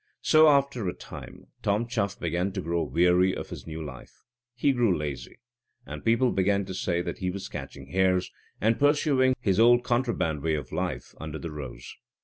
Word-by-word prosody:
So, 155 0 +6
after 140 -7 +2
a 90 - -2
time, - - -10 0.2
Tom 105 +3 +1
Chuff 105 -5 -2
began 85 +3 -1
to - - -3
grow 85 +1 -1
weary 90 +2 +3
of - - -7
his - - -8
new 80 0 -5
life; 65 -4 -11 0.3
he 140 +4 +2
grew 120 -8 +2
lazy, 70 -5 -5 0.5
and - - -8
people 115 +2 +3
began 100 +1 +1
to 95 - -6
say 85 -1 -1
that - - -5
he 90 - -1
was 95 +1 -5
catching 70 -1 -8
hares, 95 -1 +2 0.3
and 110 +1 +2
pursuing 145 -3 +3
his 95 -1 +1
old 120 +1 +6
contraband 120 - 0
way 80 +1 +1
of 70 -4 -6
life, - - -3
under 80 -1 -5
the 85 0 -6
rose. 65 -5 -8
95 Hz, 185 wpm, -27 LUFS, 80-120 Hz, 0.5 s, So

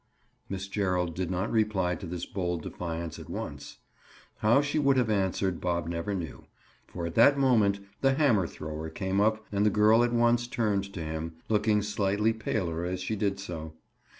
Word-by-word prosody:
Miss 95 0 -4
Gerald 90 -4 0
did 90 0 -3
not 95 +3 -1
reply 105 -5 +1
to 90 +2 -6
this 85 0 -4
bold 90 -4 -3
defiance 85 -1 -5
at - - -11
once. - - -6 0.6
How 115 +5 +4
she 145 +1 0
would 140 -2 +3
have 120 -4 +2
answered, 95 -2 0
Bob 85 -2 -1
never 85 +4 -2
knew, 80 -7 -6 0.4
for 85 -2 -5
at 85 - -4
that 140 +8 +6
moment 110 -7 +3 0.2
the 135 -1 +3
hammer 120 - +3
thrower 80 0 -6
came 95 +4 -1
up 110 +1 +1
and 100 0 +1
the 105 - +5
girl 110 +3 +5
at 120 - +1
once 120 0 +3
turned 100 -5 -1
to 85 - -4
him, 80 +1 -4 0.2
looking 105 -1 +2
slightly 105 +1 +1
paler 90 -6 -2
as 90 +1 -2
she 100 +4 -2
did 100 -1 -1
so. 80 -5 -6
100 Hz, 180 wpm, -29 LUFS, 90-110 Hz, 0.6 s, that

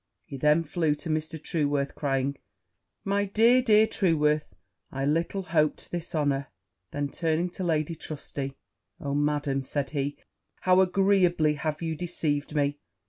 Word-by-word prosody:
He - - -8
then 150 +4 +3
flew 155 -1 0
to 160 - -7
Mr. 155 +1 -2
Trueworth, 145 -3 -1
crying, 135 -1 -1 0.7
'My 200 0 +1
dear, 230 +5 +4
dear 220 -3 +5
Trueworth! 150 - +1 0.4
I 135 0 -2
little 165 +6 0
hoped 155 -4 0
this 175 0 -4
honour!' 140 -2 0 0.4
Then, 145 -1 -2
turning 165 +3 -1
to 185 - -5
Lady 160 -1 0
Trusty, 140 -3 -6 0.4
'Oh, 140 -1 -3
Madam!' 145 -1 0
said 135 0 -3
he, 145 -1 -2 0.4
'how 185 0 +5
agreeably 180 -4 +3
have 150 +2 -3
you 160 -1 -2
deceived 155 -3 -2
me!' 145 0 +1
155 Hz, 140 wpm, -27 LUFS, 145-175 Hz, 0.7 s, dear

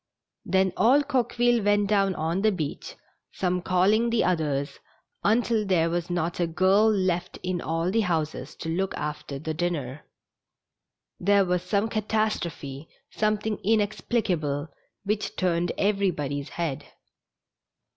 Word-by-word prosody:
Then 190 -1 +2
all 260 +8 +5
Coque 260 -4 -1
ville 240 -1 +3
went 205 0 +3
down 195 -2 +2
on 165 +4 -1
tlie 215 -1 +2
beach, 155 -4 -5 0.4
some 180 -1 -1
calling 195 +6 +3
the 230 -1 +2
oth 180 -3 +2
ers, 140 -2 -2 0.4
until 225 0 +2
there 170 -4 +2
was 175 +1 -2
not 175 -1 -2
a 175 - +2
girl 190 +6 +4
left 185 -3 -1
in 180 -1 -2
all 165 +2 -1
the 225 +2 +2
houses 155 -7 -2
to 160 - -6
loolc 190 +4 -1
after 150 -2 -5
the 155 +3 -4
dinner. 155 -5 -3 1.2
There 200 +1 +4
was 180 -1 0
some 200 +4 0
catastrophe, 210 -10 -2 0.2
something 215 0 0
inexplicable, 195 -8 0 0.3
which 210 +1 -2
turned 175 -2 0
everybody's 175 -9 0
head. 165 -6 -3
185 Hz, 135 wpm, -26 LUFS, 165-210 Hz, 1.2 s, all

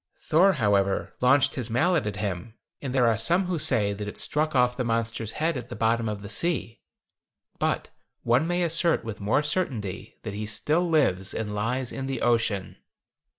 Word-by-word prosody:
Thor, 185 +5 +3
however, 100 - +1
launched 130 +3 +4
his 125 -4 -4
mallet 150 - +2
at 105 - -3
him, 105 +2 -4 0.3
and 135 - -4
there 125 -2 +3
are 115 -2 +2
some 175 +10 +2
who 180 -2 -2
say 100 -7 +3
that 105 +1 -6
it 105 - -7
struck 155 0 0
off 125 -1 +3
the 125 - -2
monster's 115 -1 -1
head 160 +1 0
at 125 -1 -7
the - - -6
bottom 115 0 +1
of 105 -1 -5
the - - -6
sea, 115 -1 -2 0.8
but - - -1 0.3
one 125 +7 +2
may 175 +1 0
assert 170 -2 +1
with 110 -2 -6
more 110 +9 +2
certainty 125 - -3
that 105 - -5
he 105 +1 -4
still 160 +10 +1
lives 95 - +1
and 105 -2 -3
lies 120 +5 -2
in 135 -1 -5
the 135 - -3
ocean. 110 -5 0
120 Hz, 190 wpm, -26 LUFS, 105-150 Hz, 0.8 s, launched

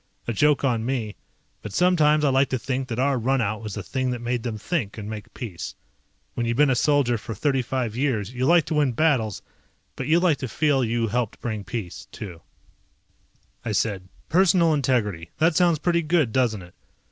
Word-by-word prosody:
A 120 - -1
joke 145 +6 +3
on 120 -5 +1
me, 115 -4 -2 0.5
but 105 - -8
sometimes 155 -4 +3
I - - +4
like 135 0 +3
to 130 - 0
think 130 +1 -3
that 115 -3 -4
our 135 0 +1
runout 115 -4 0
was 105 -3 -6
the 105 - -5
thing 130 +5 -2
that 125 -1 -2
made 120 0 -2
them 115 -2 -4
think 115 - -3
and 105 -1 -6
make 110 -1 -7
peace. 110 -10 -6 0.6
When 120 - -2
you've 115 +1 -1
been 145 -1 +5
a - - +2
soldier 130 -3 +2
for 110 +1 -6
thirty 135 +3 +1
five 120 -3 -3
years 125 -5 -1
you 130 +1 0
like 170 -1 +5
to - - -3
win 145 -4 +2
battles, 120 -8 +1 0.5
but 130 - -4
you 165 +2 +4
like 175 -5 +2
to 130 - -3
feel 140 +2 +1
you 115 -1 0
helped 120 -1 -2
bring 110 -4 -4
peace, 100 -2 -6
too. 90 -5 -8 1.2
I 115 - -2
said, 95 -2 -1 0.2
"Personal 175 -2 +4
integrity. 110 - 0
That 160 0 +3
sounds 175 -2 +4
pretty 170 +2 +1
good, 155 -6 +1
doesn't 115 -7 +1
it? 90 0 -15
125 Hz, 200 wpm, -24 LUFS, 110-145 Hz, 1.2 s, been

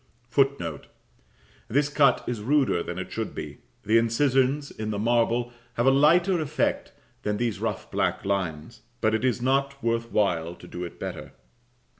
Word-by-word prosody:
[Footnote: 120 - 0 0.8
This 140 +5 +2
cut 145 -3 +3
is 120 -3 -3
ruder 135 -6 +2
than 90 - -5
it 95 - -5
should - - -4
be: - - -7 0.2
the 110 +3 +4
incisions 135 +4 +1
in 110 0 -5
the 105 - -2
marble 120 +2 +1 0.2
have 120 - +1
a 135 - +6
lighter 170 +6 +4
effect 150 -1 -1 0.3
than 105 0 -1
these 120 -2 -1
rough - - -3
black - - 0
lines; 95 +2 -3 0.2
but 110 -1 +2
it 110 - 0
is 125 -2 +1
not 140 +1 0
worth 115 0 -1
while 85 -5 +1
to - - -14
do 90 - -6
it 85 - -8
better. - - -6
120 Hz, 165 wpm, -26 LUFS, 105-140 Hz, 0.8 s, a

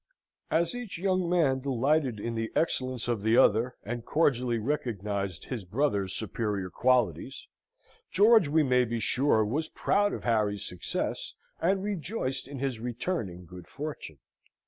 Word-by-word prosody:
As 165 +5 +1
each 245 -6 -6
young 185 -1 0
man 155 -7 +3
delighted 135 -1 +1
in 115 +3 -3
the 115 0 -3
excellence 130 -6 0
of 120 -4 0
the 110 +3 +3
other, 115 +3 +4
and 120 +2 -4
cordially 125 -5 +1
recognised 105 - -2
his 120 -6 -5
brother's 100 -2 0
superior 105 -3 -3
qualities, 125 +3 +1 0.6
George, 210 -1 +5
we 155 +2 +3
may 125 -2 +3
be 120 -1 -2
sure, 120 -2 +2
was 150 +9 -2
proud 205 0 +1
of - - -5
Harry's 105 -4 +1
success, 90 - -4 0.3
and 190 +3 +2
rejoiced 170 - -3
in 140 0 -7
his 135 -3 -2
returning 115 - -3
good 90 +1 -11
fortune. 145 - -7
125 Hz, 145 wpm, -29 LUFS, 110-155 Hz, 0.6 s, George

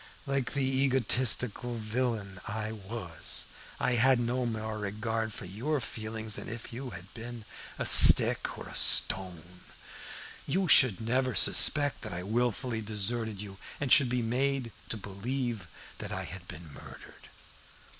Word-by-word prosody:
Like 135 -3 -3
the 140 -2 -1
egotistical 130 -2 +1
villain 110 -4 -4
I 110 0 -4
was, 100 -5 -3 0.3
I - - 0
had 130 0 +4
no 120 +1 -2
more 110 -1 -5
regard 110 +2 -4
for 100 - -9
your 125 +11 -3
feelings 110 -2 -4
than - - -8
if 115 0 -8
you 130 +2 -7
had 95 -2 -12
been 115 -1 -9 0.3
a - - -4
stick - - +7
or - - -9
a - - -11
stone. 90 -2 +3 0.9
You 190 +1 -1
should 130 - +5
never 125 +3 -1
suspect 145 -2 +4
that 110 -5 -7
I 90 +1 -6
had 105 - -6
wilfully 120 -1 -2
deserted 110 0 -1
you, 95 -2 -12 0.2
and 140 -3 -4
should 135 -4 +5
be 125 -1 -2
made 130 +1 -2 0.2
to 110 - -3
believe 110 +1 -5 0.3
that - - -7
I - - -4
had - - -9
been 80 -2 -11
murdered. - - -14
115 Hz, 150 wpm, -29 LUFS, 105-125 Hz, 0.9 s, stick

